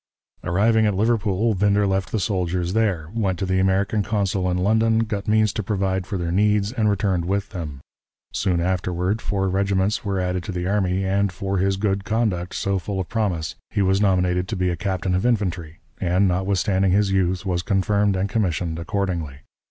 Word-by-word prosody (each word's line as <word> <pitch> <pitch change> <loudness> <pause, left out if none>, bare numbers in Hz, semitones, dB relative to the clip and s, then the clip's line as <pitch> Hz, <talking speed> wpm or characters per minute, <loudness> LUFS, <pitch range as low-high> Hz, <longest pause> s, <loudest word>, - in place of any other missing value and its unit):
Arriving 110 +5 +3
at 105 - 0
Liverpool, 110 0 +1
Winder 100 +1 +2
left 95 -1 -1
the 110 - 0
soldiers 90 -1 -1
there, 95 -8 0
went 100 -5 0
to 95 - -2
the 95 0 +1
American 95 +3 +1
consul 100 -3 0
in 90 - 0
London, 110 +4 +2
got 105 -3 -4
means 110 -1 +3
to - - -2
provide 95 -2 -1
for 100 - -3
their 85 -1 -2
needs, 105 +2 +2
and 115 -4 +1
returned 95 -3 0
with 100 +2 -1
them. 80 -8 -6 0.5
Soon 90 -3 0
afterward, 90 +3 -1
four 95 -2 -1
regiments 95 +1 0
were 100 -2 -1
added 90 0 -1
to 100 - -6
the 90 -1 -3
army, 95 -1 0
and, 100 +1 +1
for 95 +1 -2
his 95 +1 +1
good 100 -1 0
conduct 100 -5 -1
so 100 -1 0
full 95 +1 -4
of 95 - -4
promise, 95 -8 -1 0.2
he 100 - 0
was 95 +1 +2
nominated 90 -2 +2
to 110 - -3
be 90 -1 0
a - - -1
captain 95 +1 -2
of 90 - +1
infantry, 90 -9 -1 0.2
and, 90 +2 +2
notwithstanding 95 +1 +1
his 100 0 +2
youth, 95 -1 0
was 90 -2 0
confirmed 100 +1 +1
and 95 +1 0
commissioned 90 -6 -1
accordingly. 85 -6 -3
95 Hz, 190 wpm, -22 LUFS, 90-105 Hz, 0.5 s, Arriving